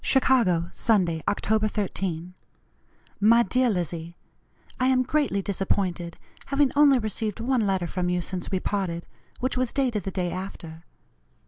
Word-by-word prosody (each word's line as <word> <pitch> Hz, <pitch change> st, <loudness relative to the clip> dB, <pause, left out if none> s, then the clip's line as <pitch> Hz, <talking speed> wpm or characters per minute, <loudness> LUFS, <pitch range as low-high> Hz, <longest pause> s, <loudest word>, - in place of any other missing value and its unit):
"CHICAGO, 210 Hz, -11 st, +3 dB
Sunday, 175 Hz, -8 st, +1 dB
Oct. 215 Hz, +1 st, +1 dB
13. 180 Hz, -4 st, -3 dB, 0.9 s
"MY 230 Hz, +3 st, +6 dB
DEAR 250 Hz, +4 st, +2 dB
LIZZIE: 170 Hz, -3 st, -3 dB, 0.6 s
I 255 Hz, -, +2 dB
am 255 Hz, -1 st, +3 dB
greatly 260 Hz, -7 st, 0 dB
disappointed, 185 Hz, -3 st, -2 dB, 0.3 s
having 280 Hz, -1 st, +2 dB
only 285 Hz, -2 st, +6 dB
received 215 Hz, -2 st, -3 dB
one 250 Hz, +1 st, +1 dB
letter 190 Hz, -2 st, 0 dB
from 180 Hz, +1 st, -2 dB
you 180 Hz, 0 st, +1 dB
since 180 Hz, 0 st, -4 dB
we 190 Hz, -, 0 dB
parted, 185 Hz, -4 st, -2 dB, 0.4 s
which 255 Hz, +1 st, -1 dB
was 255 Hz, -1 st, 0 dB
dated 250 Hz, -7 st, 0 dB
the 195 Hz, -, -4 dB
day 180 Hz, -2 st, -2 dB
after. 170 Hz, -3 st, -7 dB
200 Hz, 140 wpm, -25 LUFS, 175-245 Hz, 0.9 s, MY